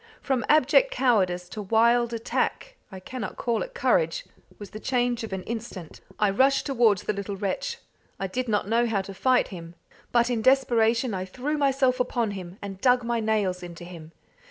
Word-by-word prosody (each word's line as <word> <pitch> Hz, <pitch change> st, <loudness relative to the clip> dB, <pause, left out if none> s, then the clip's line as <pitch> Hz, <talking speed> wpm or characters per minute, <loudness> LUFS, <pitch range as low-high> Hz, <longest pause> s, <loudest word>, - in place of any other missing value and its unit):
From 265 Hz, -3 st, -1 dB
abject 310 Hz, -, +5 dB
cowardice 190 Hz, -, +1 dB
to 215 Hz, -, -6 dB
wild 235 Hz, +3 st, +3 dB
attack 235 Hz, -, -2 dB, 0.2 s
I 190 Hz, -, -8 dB
cannot 215 Hz, +2 st, -6 dB
call 235 Hz, -2 st, -1 dB
it -, -, -6 dB
courage -, -, +1 dB, 0.3 s
was 205 Hz, -2 st, -10 dB
the 215 Hz, -, -7 dB
change 245 Hz, -1 st, 0 dB
of 225 Hz, -, -6 dB
an 190 Hz, -1 st, -4 dB
instant. 220 Hz, -7 st, -7 dB, 0.2 s
I 210 Hz, -2 st, +2 dB
rushed 270 Hz, +7 st, +3 dB
towards 230 Hz, -8 st, +2 dB
the -, -, -1 dB
little 200 Hz, 0 st, -5 dB
wretch. 205 Hz, -, -3 dB, 0.4 s
I 195 Hz, -, -2 dB
did 250 Hz, +7 st, -3 dB
not 205 Hz, -3 st, 0 dB
know 235 Hz, +2 st, +2 dB
how 205 Hz, -4 st, 0 dB
to 195 Hz, 0 st, -8 dB
fight 255 Hz, +6 st, +2 dB
him, 170 Hz, -3 st, -9 dB, 0.4 s
but 240 Hz, 0 st, +3 dB
in 230 Hz, -2 st, 0 dB
desperation 235 Hz, -2 st, +3 dB
I 185 Hz, -1 st, -3 dB
threw 255 Hz, +10 st, -3 dB
myself 270 Hz, -3 st, +2 dB
upon 240 Hz, -3 st, 0 dB
him, 185 Hz, -1 st, -8 dB
and 195 Hz, -1 st, -7 dB
dug 250 Hz, -1 st, +4 dB
my 235 Hz, 0 st, -1 dB
nails 210 Hz, -5 st, 0 dB
into 175 Hz, -1 st, -9 dB
him. 170 Hz, -2 st, -11 dB
230 Hz, 185 wpm, -26 LUFS, 195-255 Hz, 0.4 s, abject